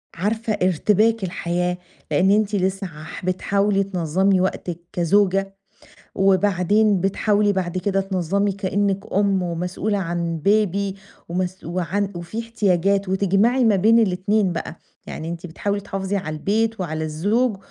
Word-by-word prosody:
عارفة 215 +5 -1
ارتباك 210 +5 +2
الحياة 180 0 -1 0.3
لأن 190 +1 +3
أنتِ 210 0 +2
لسه 190 0 -1
عح 160 +3 -9
بتحاولي 195 +2 +1
تنظّمي 185 +1 +1
وقتِك 180 -2 -2
كزوجة 195 +2 +2 0.6
وبعدين 195 +1 +3
بتحاولي 205 +2 +2
بعد 185 -2 -2
كده 195 +1 0
تنظّمي 195 +1 0
كأنِك 200 +1 -2
أم 195 -1 +2
ومسؤولة 180 +4 -2
عن 170 -3 -2
Baby 200 -1 +1 0.3
ومس 185 +1 -3
وعن 185 +4 -2
وفي 175 +6 -5
احتياجات 200 -4 +1
وتجمعِي 200 +7 +2
ما 220 -3 +4
بين 220 +5 +5
الاتنين 200 -1 +1
بقى، 165 -1 -5 0.3
يعني 160 - -6
أنتِ 170 +1 -6
بتحاولي 200 +5 -3
تحافظي 195 0 -3
على 155 -5 -4
البيت 220 +6 0
وعلى 160 -3 -3
الزوج 200 +9 0
195 Hz, 130 wpm, -22 LUFS, 180-205 Hz, 0.6 s, بين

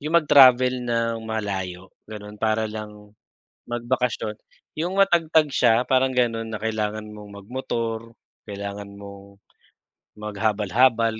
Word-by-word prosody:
yung 155 +3 -4
mag-travel 130 -5 +6
ng 115 -1 -1
malayo 95 -5 -4 0.2
ganon 105 -1 -9
para 110 0 +1
lang 105 -1 -9 0.6
magbakasyon 120 -2 -2 0.4
yung 170 +4 -2
matagtag 165 -5 +3
siya 120 -2 +4
parang 130 0 +3
ganon 115 -2 0
na 110 - -4
kailangan 110 -1 -2
mong 105 -1 -11
mag-motor, 115 -1 -4 0.3
kailangan 100 0 -6
mong 100 0 -12 0.8
maghabal-habal 110 +2 +1
110 Hz, 105 wpm, -23 LUFS, 105-125 Hz, 0.8 s, mag-travel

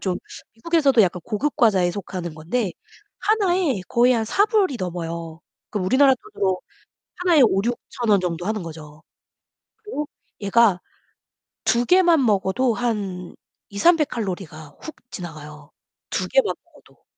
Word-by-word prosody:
좀 185 -2 -1 0.4
미국에서도 275 -1 +3
약간 180 -1 0
고급 270 +8 -2
과자에 190 -6 +3
속하는 180 -3 -6
건데 180 +7 -2 0.5
하나에 370 - +1
거의 245 +2 +4
한 225 -2 +1
4 395 - +3
불이 400 - +1
넘어요. 170 -2 -5 0.3
그럼 200 -4 -2
우리나라 265 +6 +5
돈으로 200 - -2 0.6
하나에 350 -5 +4
5,000-6,000 235 +3 -1
원정도 180 -4 +1
하는 215 -1 -2
거죠. 155 -1 -11 0.8
그리고 420 -9 -5 0.4
얘가 200 -2 +3 0.8
2 240 +1 +2
개만 345 -4 +4
먹어도 215 +4 +1
한 200 -7 -3 0.3
2~300kcal 220 - +1
가 155 -2 -13
훅 315 - -8 0.2
지나가요. 150 -4 -9 0.4
2 - - -2
개만 - - +2
먹어도. - - -23
210 Hz, 260 characters per minute, -22 LUFS, 180-275 Hz, 0.8 s, 우리나라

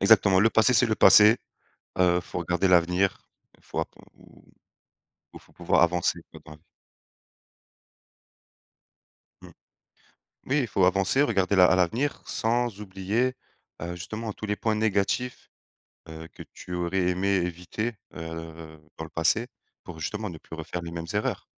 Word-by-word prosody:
Exactement. 95 -2 +5
Le 115 +3 +4
passé, 115 +3 +3
c'est - - +4
le 110 - 0
passé, 105 +1 +7 0.6
heu, 90 -1 +4
il 90 - -1
faut - - -6
regarder 90 +2 0
l'avenir, 90 +2 +2 0.4
il - - -30
faut - - -7
appr - - -7 1.4
il - - -10
faut - - -24
pouvoir - - +1
avancer, 85 0 +1
quoi, - - -12
dans 75 - -11
la - - -12
vie. 75 - -30 2.8
Mmh, - - -12 1.0
oui, 140 +3 +1
il 130 - -1
faut 95 -4 +1
avancer, 95 +8 +2
regarder 100 -7 +1
la 90 -1 +7
à 95 - +3
l'avenir 115 +11 0
sans 115 -2 -1
oublier, 105 +6 -1 0.5
heu, 85 +1 -4
justement 110 +6 -6
tous 110 - -7
les 105 0 -1
points 110 0 -1
négatifs, 110 +3 -1 0.6
heu, 80 0 -9
que - - -10
tu 90 - -9
aurais 90 +1 0
aimé 90 +2 -1
éviter, 90 +6 -3 0.2
heu, 80 -1 -8 0.2
dans - - -6
le 80 - -9
passé, 90 +9 +1 0.4
pour 85 -2 -10
justement 105 +6 -4
ne 85 - -9
plus 80 - -11
refaire 80 +2 -6
les 85 -1 -7
mêmes 85 -1 -5
erreurs. 105 +1 -2
95 Hz, 160 wpm, -26 LUFS, 85-110 Hz, 2.8 s, passé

